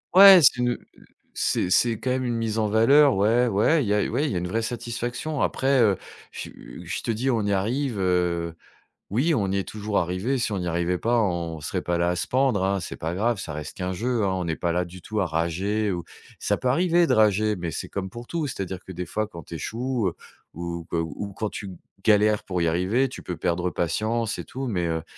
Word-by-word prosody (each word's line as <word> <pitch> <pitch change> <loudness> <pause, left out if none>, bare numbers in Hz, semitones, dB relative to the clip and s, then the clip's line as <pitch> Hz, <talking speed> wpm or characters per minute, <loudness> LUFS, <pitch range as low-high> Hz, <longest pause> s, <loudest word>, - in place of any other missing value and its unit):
Ouais, 195 -1 +11
c'est 130 - +6
une, 125 0 +1
heu, - - +1 0.2
heu, - - -18 0.3
c'est 90 - 0
c'est 115 +3 +3
quand 130 - -3
même 130 0 0
une 120 - -1
mise 115 -1 -2
en 110 -1 +2
valeur. 135 +6 +5
Ouais, 115 +5 +3
ouais, 120 +9 +3
il - - -3
y 105 - +2
a 105 - +3
ouais, 135 +7 0
il 145 - -1
y - - -2
a - - +1
une 90 - -3
vraie 115 +4 -1
satisfaction. 120 +5 -4
Après, 135 -1 +2
heu, 100 -4 +4 0.3
je - - -9
su - - -10
je - - -4
te - - 0
dis, 120 +5 -1
on 115 -4 +1
y 100 - +1
arrive, 115 +3 -1
heu. 90 -2 0 0.5
Oui, 135 - +2
on 100 -8 0
y 100 - 0
est 95 -2 -2
toujours 105 -1 -3
arrivé. 90 +10 0
Si 120 -3 -1
on 95 - -1
n'y 90 - -3
arrivait 85 +1 0
pas, 120 +1 +2
on 85 -6 -1
serait - - -3
pas 85 0 -1
là, 85 0 +1
à 90 - -1
se - - -2
pendre, 130 -7 +2
hein. 95 0 +1
C'est 90 - -6
pas 80 +2 -3
grave, 115 +2 0
ça 80 - -5
reste 75 0 -6
qu'un 95 0 -3
jeu, 115 +2 -1
hein. 95 - +2
On 90 -2 -2
n'est 80 - -1
pas 85 0 -1
là 90 +1 0
du 90 +1 -11
tout 110 +3 -3
à - - +1
rager 95 +6 -1
ou, 85 -2 -3 0.3
ça - - 0
peut - - -3
arriver 170 +3 +3
de - - +3
rager, 110 0 +3
mais 85 -2 -4
c'est - - -5
comme 95 -1 -4
pour 120 +3 -9
tout: 165 -3 -2
c'est-à-dire 95 -8 -5
que 95 - -8
des 90 -1 -5
fois, 110 +3 -2
quand 85 -5 -10
tu 85 - -9
échoues, 115 - -2
heu, - - -9 0.4
ou 85 0 -5
que - - -1
ou 85 +5 -4
quand 110 +2 -3
tu 100 -2 -7 0.3
galères 105 -1 +4
pour 90 -2 -2
y - - +2
arriver, 95 +11 +1
tu - - -9
peux 90 - -5
perdre 90 +1 0
patience 110 +7 -1
et - - -4
tout, 135 +1 -6
mais, 90 -7 -1
heu, 80 -1 -2
105 Hz, 255 wpm, -25 LUFS, 90-120 Hz, 0.5 s, Ouais